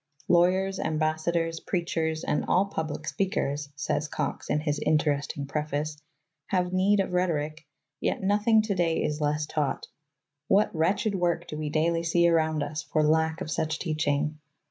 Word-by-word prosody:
Lawyers, 185 +2 +3
ambassadors, 160 +1 0
preachers, 165 -3 -2
and - - 0
all 190 +2 +3
public 155 -5 -4
speak 195 -1 -1
ers, 145 +1 -1
says 150 +1 -1
Cox - - -4
in 150 - +2
his 150 -1 -1
interesting 145 -2 0
preface, 150 +1 -2 0.5
have 180 -1 0
need 195 +2 +3
of 195 - 0
rhetoric, 155 -4 -1 0.3
yet - - -1
nothing 210 +3 +4
today 175 -6 0
is 150 +1 -2
less 150 +1 0
taught. 150 -2 -2 0.6
What 205 +2 +3
wretched 195 +6 +1
work 175 -2 0
do - - -6
we 150 -1 -3
daily 165 +2 +1
see 170 +1 +3
around 160 -2 +2
us 150 +2 -4
for 155 -1 0
lack 160 +1 +2
of 155 - -4
such 160 0 -1
teaching 150 -2 -1
160 Hz, 155 wpm, -27 LUFS, 150-180 Hz, 0.6 s, nothing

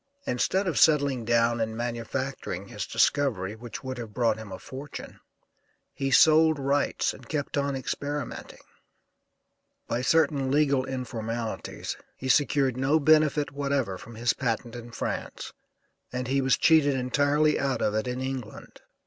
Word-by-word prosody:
Instead 190 +11 0
of 180 - 0
settling 140 -6 +3
down 115 0 +2
and 110 0 -2
manufacturing 120 +3 -4
his - - -5
discovery, 110 -9 +1
which 115 +2 -8
would 130 -1 -5
have 110 -3 -8
brought 115 -3 +1
him 110 -3 -9
a 95 - -5
fortune, 135 +7 -9 0.7
he 135 -1 -2
sold 155 +3 +6
rights 140 +1 0
and 125 -3 -14
kept 145 -2 -2
on 140 -1 0
experimenting. 140 +1 -5 1.2
By 120 - -1
certain 140 -1 +2
legal 140 -2 +2
informalities 115 -3 -4 0.2
he 130 - -5
secured 135 -2 +3
no 135 +4 +2
benefit 155 -1 +3
whatever 140 -9 -1
from 115 - -11
his 120 +2 +1
patent 120 -1 -2
in 120 0 -8
France - - -5 0.6
and 125 0 -3
he 135 +1 +1
was 135 0 +3
cheated 155 -4 +4
entirely 145 +4 +2
out 135 -2 0
of 105 - +1
it 110 +2 -1
in 125 +1 -3
England. 130 -4 -6
130 Hz, 145 wpm, -27 LUFS, 120-145 Hz, 1.2 s, sold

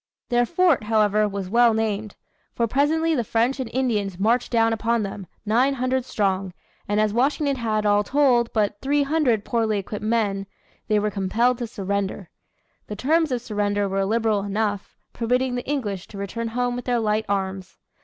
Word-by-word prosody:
Their 240 0 +2
fort, 340 -8 +2
however, 215 -1 +3
was 195 -2 -4
well 235 +2 +4
named. 215 -1 -2 0.4
For 235 - +1
presently 310 +7 +1
the 250 -6 +1
French 235 +5 0
and 255 -3 -3
Indians 215 -8 -1
marched 230 +5 +1
down 225 -1 +3
upon 225 0 0
them, 195 -1 -6 0.2
nine 250 +6 +2
hundred 255 0 -1
strong, 195 -6 -1 0.3
and 205 +1 +1
as 215 -1 +2
Washington 275 +3 +1
had, 215 -3 -1
all 205 0 +3
told, 250 -2 +2
but 205 -2 0
three 285 +1 +2
hundred 275 -8 +1
poorly 225 -3 0
equipped 200 +1 -5
men, 210 -3 0 0.4
they 215 - +2
were 210 0 0
compelled 225 +6 +1
to 240 - -3
surrender. 200 -4 -3 0.6
The 210 - -5
terms 315 - +1
of 245 -2 -1
surrender 205 -2 -1
were 195 0 0
liberal 220 0 +1
enough, 205 0 -2 0.2
permitting 250 +2 0
the 245 +2 -4
English 205 -10 -2
to 200 - -11
return 215 +4 -4
home 245 +1 -1
with 245 - -6
their 245 -1 +1
light 215 0 0
arms. 190 -1 -3
225 Hz, 175 wpm, -23 LUFS, 205-245 Hz, 0.6 s, well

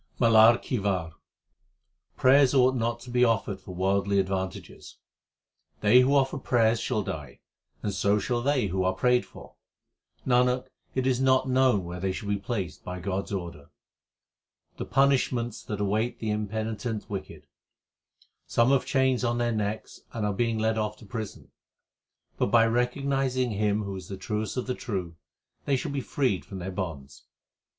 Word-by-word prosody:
MALAR 115 -1 +7
KI 125 - -3
WAR 90 -5 -1 1.0
Prayers 135 +1 +5
ought 130 0 +5
not 120 -1 -1
to 125 - -10
be 125 0 +3
offered 110 -4 +1
for 90 -2 -9
worldly 100 +2 +1
advan 95 -1 -2
tages: - - -12 0.8
They 110 +4 +6
who 130 +3 +4
offer 135 +1 +2
prayers 115 -3 +2
shall 110 -4 -1
die, 75 -8 -7 0.4
and 100 - -1
so 100 +2 +2
shall 120 +3 -1
they 135 -2 +1
who 95 -1 -1
are 95 0 +1
prayed 125 +5 +2
for. - - -14 0.7
Nanak, 125 0 +2 0.3
it 130 -1 0
is 130 -1 +1
not 130 0 +3
known 130 -6 +3
where 85 +1 -6
they 95 +1 -1
shall 100 +2 -5
be 100 - +1
placed 100 -3 -4
by 90 0 -6
God 95 +1 -2
s - - -12
order. 85 -7 -6 1.1
The - - -4
punishments 130 -4 +1
that 105 -2 -4
await 105 +4 0
the 110 -1 -3
impenitent 110 +1 -3
wicked: 90 -6 -7 1.0
Some 120 +3 +3
have 135 -2 +2
chains 130 -2 +2
on 120 -1 0
their 120 0 0
necks 110 -1 -3
and 110 -3 -2
are 105 - 0
being 115 +2 0
led 110 0 0
off 105 0 -2
to 110 - -14
prison; 110 0 -7 0.9
But - - +2
by 115 +2 +5
recognizing 130 +1 0
Him 105 0 0
who 100 -1 -5
is 95 -2 -8
the 95 - -6
truest 105 +2 -3
of 125 - -1
the 125 - -2
true, 95 -9 -4 0.5
they 140 - +2
shall 130 - -3
be 140 -1 -2
freed 125 -4 -1
from 95 - -9
their 95 +1 -5
bonds. 80 -7 -6
110 Hz, 170 wpm, -27 LUFS, 100-125 Hz, 1.1 s, MALAR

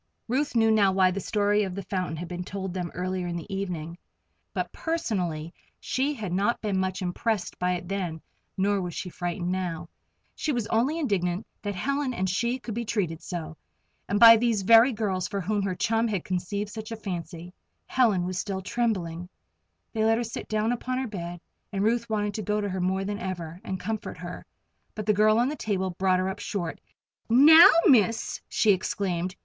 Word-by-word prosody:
Ruth 265 +3 0
knew 225 -1 +4
now 205 -3 +4
why 190 -1 +4
the 195 - -3
story 205 +1 +1
of 190 -3 -2
the 200 - -5
fountain 185 -3 -2
had 175 +2 -5
been 180 +1 -5
told 190 0 -5
them 180 -2 -3
earlier 185 0 -2
in 170 - -3
the 170 +4 -6
evening, 175 -3 -4 0.5
but - - -3
personally 180 - -2 0.3
she 280 +3 -1
had 205 -8 -4
not 200 +6 +1
been 200 -3 -1
much 185 0 -2
impressed 185 +1 -2
by 180 0 +1
it 180 0 -5
then, 180 -4 -3 0.4
nor 200 +1 +1
was 175 -2 -5
she 180 - -4
frightened 175 +1 -3
now. 180 -3 -3 0.4
She 310 - -2
was 240 -5 -1
only 250 +9 +1
indignant 195 - -1 0.2
that 205 -1 -3
Helen 275 +5 -1
and 190 -2 0
she 235 +7 0
should 230 - -4
be 235 +2 -2
treated 180 -8 -2
so 165 -3 -6 0.5
and 205 +1 +1
by 230 0 +10
these 225 -3 +1
very 230 +5 +7
girls 200 -5 -1
for 200 - -3
whom 205 +3 -1
her 195 -2 -1
chum 225 +3 +1
had 200 -6 -2
conceived 200 +3 -3
such 220 +1 -7
a - - -2
fancy. 175 -3 -6 0.3
Helen 215 -9 +2
was 185 0 -3
still 190 -2 -3
trembling. 180 -7 -2 0.6
They 220 -2 0
let 225 +1 +4
her 240 - -1
sit 230 - -6
down 215 +1 0
upon 255 +1 -2
her 260 0 -2
bed, 175 -4 -6 0.3
and 200 -1 -1
Ruth 235 +1 +1
wanted 210 -1 -1
to 215 - -3
go 210 +1 0
to 205 -1 -2
her 185 -1 -3
more 190 +2 0
than 205 +1 -3
ever, 175 -2 -5
and 190 -1 -4
comfort 220 +1 -4
her. - - -8 0.5
But 215 - -4
the 210 - +3
girl 215 +2 +4
on 240 +2 +3
the 300 - -3
table 190 -7 -1
brought 185 +1 +2
her 185 +1 0
up 190 +2 -4
short. 175 -6 -4 0.5
"Now, 305 +8 +9 0.2
Miss!" 230 - +3
she 215 - +3
exclaimed. 185 -1 -1
200 Hz, 200 wpm, -27 LUFS, 180-225 Hz, 0.6 s, by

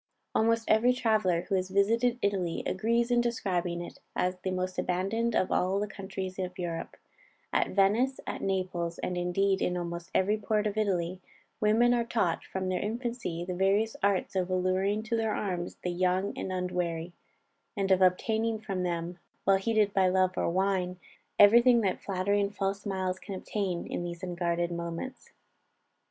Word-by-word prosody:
Almost 230 0 +2
every 235 +3 +4
traveller 215 -8 +2
who 195 - -5
has 185 -1 0
visited 230 +5 +2
Italy, 190 -4 0
agrees 235 +5 +1
in 240 0 +4
describing 180 -7 -1
it - - -12 0.2
as 180 0 0
the 185 - -3
most 185 0 -2
abandoned 200 +6 0
of 185 - +1
all 190 +2 +2
the 205 - 0
countries 190 -2 -6
of 180 -1 -4
Europe. 170 -2 -4 0.6
At - - +1
Venice, 220 +7 +3
at - - -4
Naples, 180 -3 -2
and 180 - -3
indeed 190 +2 +1
in 180 - 0
almost 170 0 -5
every 210 +3 +2
port 215 0 0
of 210 -1 -1
Italy, 185 -4 -1 0.4
women 225 +3 +4
are 240 -1 +2
taught 220 -8 0
from 190 0 -4
their 185 -1 0
infancy 225 -6 -3
the 180 - -3
various 195 +4 +2
arts 200 -1 +1
of 185 -1 0
alluring 185 +3 +1
to 230 +1 -1
their 220 -1 0
arms 180 -4 -3
the 180 - -1
young 185 +2 0
and 190 - -4
unwary, 180 -2 -2 0.6
and 195 -1 0
of 190 0 +4
obtaining 220 +5 +2
from 200 -4 -4
them, 175 0 -3 0.2
while 195 0 +4
heated 210 0 +1
by 190 -1 +4
love 185 0 +2
or - - 0
wine, 185 0 0 0.4
every 210 +4 +8
thing 240 -1 +5
that 190 -4 -1
flattery 200 +1 0
and 200 +1 -2
false 195 0 -1
smiles 190 -2 -2
can 200 - -7
obtain, 185 -2 -3
in - - -4
these 175 +1 -6
unguarded 175 -1 -1
moments. 170 +9 -5
190 Hz, 170 wpm, -29 LUFS, 180-215 Hz, 0.6 s, every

